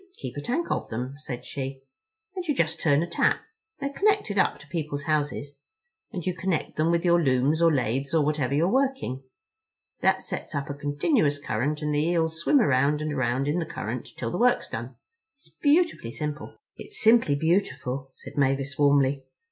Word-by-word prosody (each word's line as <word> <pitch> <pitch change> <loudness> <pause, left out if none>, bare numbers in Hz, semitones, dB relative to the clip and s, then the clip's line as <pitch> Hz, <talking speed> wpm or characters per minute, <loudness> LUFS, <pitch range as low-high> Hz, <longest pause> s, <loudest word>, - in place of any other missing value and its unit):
"We 380 - -25
keep - - -6
a 145 - -4
tank 265 - -2
of - - -2
them," 125 +4 -4
said 130 -5 -6
she, 135 -1 -5 0.5
"and 365 - -3
you 295 - +1
just 160 -6 0
turn 145 0 +3
a - - -3
tap—they're 440 - -2
connected 405 - +2
up - - +2
to 145 - -15
people's 150 -2 -3
houses—and 155 - -5
you 185 - 0
connect 180 -2 -2
them 155 +2 +2
with 170 +1 +1
your 170 0 +5
looms 135 +3 +2
or 165 -1 +6
lathes 135 0 0
or 155 -3 +3
whatever 145 -3 0
you're 160 +4 +3
working. 265 - 0 0.8
That - - +2
sets - - -5
up 140 0 -2
a - - -3
continuous 145 - +1
current 145 +3 -2
and 150 0 0
the 145 - +2
eels 160 -1 0
swim 280 - +4
around 145 - +2
and 155 -1 -2
around 130 0 0
in 155 +4 +1
the 165 - -2
current 120 -2 -5
till 115 -2 -3
the 180 - -3
work's 245 0 +3
done. 120 +3 -6 0.4
It's - - -20
beautifully 300 - +2
simple." 150 -1 -5 0.2
"It's 425 - -7
simply 225 -10 +5
beautiful," 140 -5 -1
said - - -12
Mavis 135 0 +1
warmly. 140 -1 +3
150 Hz, 185 wpm, -26 LUFS, 140-185 Hz, 0.8 s, or